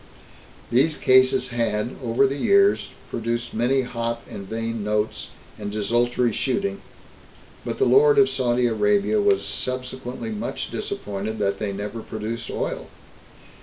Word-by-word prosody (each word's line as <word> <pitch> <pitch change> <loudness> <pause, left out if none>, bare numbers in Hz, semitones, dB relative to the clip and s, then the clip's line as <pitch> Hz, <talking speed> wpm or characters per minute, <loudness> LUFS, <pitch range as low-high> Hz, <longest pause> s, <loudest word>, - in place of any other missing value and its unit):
These 140 +6 +3
oases 130 0 +5
had, 115 -1 -1
over 120 +3 +3
the 135 +1 0
years, 400 - +3 0.2
produced 120 +1 -2
many 130 +4 +2
hot 115 -1 -3
and 100 -1 -8
vain 115 0 -3
notes, 105 +1 -1 0.3
and 105 -1 -4
desultory 120 +3 +1
shooting, 200 - -1 0.8
but - - -4
the 405 - +3
Lord 435 +2 +5
of 410 -1 +7
Saudi 125 -1 +1
Arabia 105 -2 +2
was 100 -1 +2
subsequently 125 -2 -3
much 105 - -4
disappointed 105 +2 -4
that 100 -1 0
they 105 -2 -2
never 105 +3 -5
produced 110 +2 -5
oil. - - -3
115 Hz, 130 wpm, -23 LUFS, 105-130 Hz, 0.8 s, of